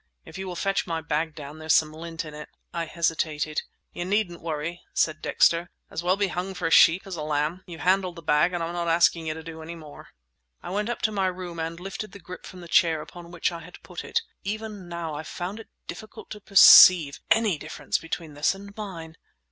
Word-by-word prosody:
"If -, -, -12 dB
you 190 Hz, -, -5 dB
will 180 Hz, -, -5 dB
fetch 195 Hz, +2 st, -1 dB
my 165 Hz, -1 st, -1 dB
bag 155 Hz, 0 st, -2 dB
down, 150 Hz, +1 st, -9 dB
there's 160 Hz, 0 st, +2 dB
some 155 Hz, -1 st, +2 dB
lint 165 Hz, +1 st, -6 dB
in 155 Hz, -, -9 dB
it." 150 Hz, 0 st, -9 dB, 0.2 s
I 170 Hz, -1 st, -2 dB
hesitated. 155 Hz, -2 st, -1 dB, 0.3 s
"You 175 Hz, -, -4 dB
needn't 185 Hz, -2 st, -1 dB
worry," 165 Hz, +1 st, -4 dB
said 155 Hz, -1 st, +1 dB
Dexter; 170 Hz, +1 st, +2 dB, 0.2 s
"as -, -, -3 dB
well 180 Hz, +2 st, +2 dB
be 200 Hz, -1 st, +1 dB
hung 185 Hz, +2 st, -4 dB
for -, -, -4 dB
a 165 Hz, -, 0 dB
sheep 170 Hz, +3 st, +6 dB
as 195 Hz, -2 st, -6 dB
a 160 Hz, -, -5 dB
lamb. 150 Hz, +4 st, -1 dB
You've 170 Hz, -2 st, -9 dB
handled 185 Hz, -1 st, +2 dB
the 170 Hz, -, -10 dB
bag, 150 Hz, +3 st, +3 dB
and 175 Hz, -2 st, -2 dB
I'm 165 Hz, +1 st, -3 dB
not 170 Hz, -1 st, -2 dB
asking 165 Hz, -1 st, +3 dB
you 155 Hz, -, -2 dB
to 160 Hz, -, -8 dB
do 160 Hz, 0 st, -9 dB
any 165 Hz, +2 st, -7 dB
more." 155 Hz, -3 st, -12 dB, 0.6 s
I -, -, -6 dB
went 210 Hz, +3 st, -1 dB
up 240 Hz, -, -4 dB
to 215 Hz, -, +2 dB
my 195 Hz, -2 st, 0 dB
room 180 Hz, -2 st, -5 dB
and 165 Hz, +1 st, -4 dB
lifted 195 Hz, +2 st, -6 dB
the 200 Hz, -, -10 dB
grip 180 Hz, 0 st, -10 dB
from 185 Hz, -, -11 dB
the 175 Hz, -, -10 dB
chair 165 Hz, -2 st, +3 dB
upon 170 Hz, +2 st, -10 dB
which 175 Hz, 0 st, -1 dB
I 170 Hz, -, -6 dB
had 175 Hz, +2 st, -13 dB
put 180 Hz, -2 st, -8 dB
it. -, -, -1 dB, 0.2 s
Even 210 Hz, -2 st, -5 dB
now 170 Hz, -2 st, -4 dB
I 150 Hz, -, -4 dB
found 180 Hz, +6 st, -6 dB
it 225 Hz, -, -12 dB, 0.2 s
difficult 215 Hz, -1 st, -10 dB
to 210 Hz, -, -7 dB
perceive 180 Hz, -6 st, +8 dB
any 215 Hz, -8 st, +3 dB
difference 145 Hz, 0 st, -3 dB
between 165 Hz, -1 st, -6 dB
this 145 Hz, +6 st, +1 dB
and 200 Hz, +1 st, -12 dB
mine. 165 Hz, -6 st, -7 dB
170 Hz, 230 wpm, -26 LUFS, 160-185 Hz, 0.6 s, perceive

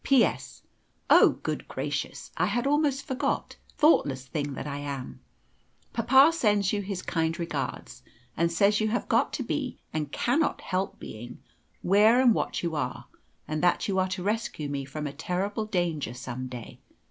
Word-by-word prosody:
"P.S. 270 Hz, -4 st, +2 dB, 0.5 s
Oh, -, -, +7 dB
good -, -, -3 dB
gracious! -, -, -4 dB
I -, -, +1 dB
had 240 Hz, +1 st, -1 dB
almost 285 Hz, -1 st, +1 dB
forgot 260 Hz, -2 st, -2 dB, 0.2 s
thoughtless 140 Hz, -, +3 dB
thing 145 Hz, +1 st, -3 dB
that -, -, -5 dB
I 145 Hz, -1 st, -4 dB
am. 140 Hz, -, -6 dB, 0.7 s
Papa 265 Hz, +6 st, +6 dB
sends 205 Hz, -, +2 dB
you 205 Hz, -, 0 dB
his 195 Hz, -2 st, -5 dB
kind 165 Hz, 0 st, -1 dB
regards, 170 Hz, -1 st, -4 dB, 0.3 s
and 170 Hz, +1 st, +1 dB
says 200 Hz, +5 st, +3 dB
you 215 Hz, -, +2 dB
have 235 Hz, +3 st, -1 dB
got -, -, +2 dB
to -, -, -2 dB
be, -, -, -3 dB, 0.2 s
and 150 Hz, -2 st, -2 dB
cannot 290 Hz, -, +1 dB
help 185 Hz, +1 st, -2 dB
being, 115 Hz, +3 st, -9 dB, 0.5 s
where 210 Hz, +6 st, +5 dB
and 250 Hz, -3 st, +6 dB
what -, -, -2 dB
you 170 Hz, -1 st, -1 dB
are; 145 Hz, -, -3 dB, 0.4 s
and 155 Hz, 0 st, -2 dB
that 175 Hz, -, +2 dB
you 190 Hz, -2 st, +1 dB
are 185 Hz, -, +2 dB
to 185 Hz, -1 st, -4 dB
rescue 205 Hz, -8 st, -2 dB
me 140 Hz, -1 st, -3 dB
from 150 Hz, +3 st, -5 dB
a 140 Hz, -, -4 dB
terrible 195 Hz, +8 st, -2 dB
danger 170 Hz, -, -1 dB
some 130 Hz, 0 st, -5 dB
day. 125 Hz, -3 st, -9 dB
185 Hz, 170 wpm, -27 LUFS, 145-220 Hz, 0.7 s, Oh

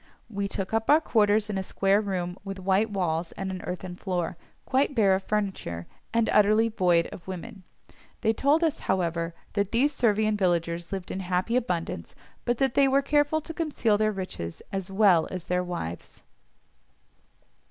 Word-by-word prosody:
We 200 Hz, -1 st, -2 dB
took 195 Hz, +1 st, -4 dB
up 225 Hz, 0 st, 0 dB
our 300 Hz, +2 st, +7 dB
quarters 215 Hz, -7 st, +2 dB
in 205 Hz, -2 st, -2 dB
a -, -, -2 dB
square 195 Hz, +2 st, +2 dB
room 180 Hz, -3 st, -3 dB
with 195 Hz, -1 st, -6 dB
white 190 Hz, +3 st, +1 dB
walls 170 Hz, -4 st, -1 dB
and 190 Hz, -1 st, -4 dB
an 185 Hz, -1 st, -5 dB
earthen 180 Hz, 0 st, -5 dB
floor, 180 Hz, -2 st, -2 dB, 0.3 s
quite 270 Hz, +2 st, +1 dB
bare 200 Hz, -5 st, +4 dB
of 190 Hz, -, +1 dB
furniture, 190 Hz, -, -2 dB, 0.3 s
and 230 Hz, -1 st, +2 dB
utterly 215 Hz, +2 st, +5 dB
void 175 Hz, -6 st, +3 dB
of 175 Hz, -, -11 dB
women. 190 Hz, +3 st, -7 dB, 0.6 s
They 220 Hz, -1 st, +2 dB
told 290 Hz, +8 st, +2 dB
us, 320 Hz, -3 st, +1 dB
however, 170 Hz, -2 st, 0 dB, 0.2 s
that 200 Hz, -1 st, 0 dB
these 275 Hz, +6 st, +2 dB
Servian 215 Hz, -2 st, +2 dB
villagers 170 Hz, -3 st, 0 dB
lived 190 Hz, -2 st, -4 dB
in 190 Hz, -, -3 dB
happy 185 Hz, +5 st, -1 dB
abundance, 170 Hz, -, -2 dB, 0.3 s
but 240 Hz, 0 st, +1 dB
that 265 Hz, -1 st, +1 dB
they 280 Hz, -1 st, +5 dB
were 275 Hz, +1 st, +3 dB
careful 295 Hz, +2 st, +2 dB
to 325 Hz, -, -7 dB
conceal 290 Hz, -10 st, 0 dB
their 215 Hz, 0 st, +2 dB
riches, 185 Hz, -, -6 dB
as 195 Hz, -2 st, -3 dB
well 195 Hz, -4 st, +4 dB
as 180 Hz, -2 st, -6 dB
their 180 Hz, 0 st, 0 dB
wives. 170 Hz, -, -6 dB
195 Hz, 175 wpm, -27 LUFS, 180-225 Hz, 0.6 s, our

